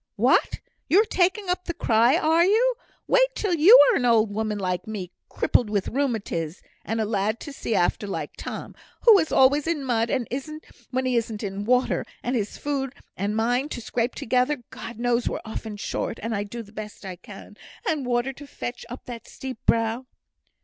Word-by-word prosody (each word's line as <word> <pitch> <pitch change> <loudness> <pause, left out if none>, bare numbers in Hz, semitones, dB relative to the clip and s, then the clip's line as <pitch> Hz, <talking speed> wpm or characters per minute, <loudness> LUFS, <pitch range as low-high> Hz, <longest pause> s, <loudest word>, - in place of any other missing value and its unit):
"What! - - +2 0.3
you're 405 +6 +5
taking 385 0 +1
up 360 0 -1
the 345 - -4
cry, 235 -4 +3
are 320 +2 +3
you? 450 +7 +3 0.3
Wait - - +3
till 405 -4 -1
you 350 +9 +8
are - - +2
an - - -1
old 220 -3 +3
woman 215 0 -2
like 185 +1 -2
me, 195 -5 -5 0.2
crippled 235 - +1
with 205 -2 -1
rheumatiz, 215 - -2 0.2
and 225 +1 -2
a 220 - +1
lad 210 +1 -1
to 290 - -7
see 230 - -2
after 180 +3 +1
like 160 -6 -4
Tom, - - -7 0.3
who 445 -4 +8
is 320 - -1
always 280 +3 +4
in 325 -4 -1
mud 230 -2 +1 0.8
when 260 0 -1
he 255 -2 +1
isn't 225 -2 -2
in 200 0 -4
water; 250 +2 +2 0.2
and 250 +2 -1
his 210 -3 -2
food 275 -2 -3 0.2
and 205 +2 -2
mine 245 +6 +1
to 245 - -5
scrape 240 +1 -2
together 255 +2 0
(God 230 - -8
knows 240 0 +1
we're - - -3
often 220 -1 -6
short, 225 - -3
and 205 -3 -2
do 235 +1 -6
the 205 - -17
best 210 -1 -8
I 185 -1 -5
can), 200 +3 -12 0.3
and 310 -6 0
water 245 +2 0
to 285 +2 -12
fetch 245 -2 -6
up 245 - -9
that 235 -2 -8
steep 260 -3 -8
brow." 230 +2 +1
240 Hz, 190 wpm, -25 LUFS, 215-285 Hz, 0.8 s, you